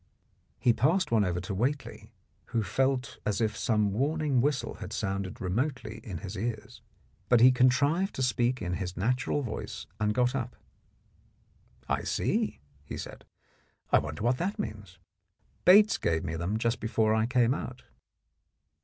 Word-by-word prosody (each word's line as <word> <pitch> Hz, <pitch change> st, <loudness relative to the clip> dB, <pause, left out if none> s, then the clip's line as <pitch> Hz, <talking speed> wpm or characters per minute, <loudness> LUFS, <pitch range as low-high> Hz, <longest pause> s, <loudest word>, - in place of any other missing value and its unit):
He 120 Hz, -, +3 dB
passed 160 Hz, +11 st, +2 dB
one 110 Hz, -3 st, +4 dB
over 90 Hz, -2 st, -1 dB
to 95 Hz, +2 st, -5 dB
Whately, 135 Hz, +8 st, -2 dB, 0.3 s
who 115 Hz, -, -1 dB
felt 130 Hz, +2 st, 0 dB
as 105 Hz, 0 st, -1 dB
if 110 Hz, -2 st, 0 dB
some 105 Hz, -3 st, +1 dB
warning 145 Hz, +2 st, +1 dB
whistle 140 Hz, -1 st, -1 dB
had -, -, -7 dB
sounded 95 Hz, +3 st, -3 dB
remotely 110 Hz, +3 st, -2 dB
in 95 Hz, -6 st, -6 dB
his 95 Hz, +5 st, -7 dB
ears. 110 Hz, +1 st, -5 dB, 0.5 s
But 120 Hz, -, +6 dB
he 125 Hz, +2 st, +8 dB
contrived 140 Hz, +9 st, +2 dB
to 130 Hz, -, -1 dB
speak 125 Hz, 0 st, +1 dB
in 90 Hz, 0 st, -2 dB
his 90 Hz, 0 st, -4 dB
natural 125 Hz, +7 st, 0 dB
voice, 110 Hz, -8 st, -5 dB
and 105 Hz, 0 st, +1 dB
got 125 Hz, 0 st, +2 dB
up. 125 Hz, -2 st, -3 dB, 1.3 s
"I -, -, 0 dB
see," -, -, -1 dB, 0.2 s
he -, -, -7 dB
said; -, -, -8 dB, 0.7 s
"I -, -, +6 dB
wonder 75 Hz, +5 st, -5 dB
what 120 Hz, +2 st, +2 dB
that 190 Hz, +4 st, -1 dB
means. 105 Hz, -5 st, -6 dB, 0.7 s
Bates 205 Hz, +3 st, +7 dB
gave 80 Hz, -1 st, 0 dB
me 80 Hz, -, -3 dB
them 90 Hz, +6 st, -1 dB
just 115 Hz, +2 st, 0 dB
before 110 Hz, -1 st, +1 dB
I 110 Hz, +1 st, +2 dB
came 125 Hz, -1 st, +3 dB
out." 130 Hz, -2 st, -6 dB
115 Hz, 155 wpm, -29 LUFS, 105-130 Hz, 1.3 s, he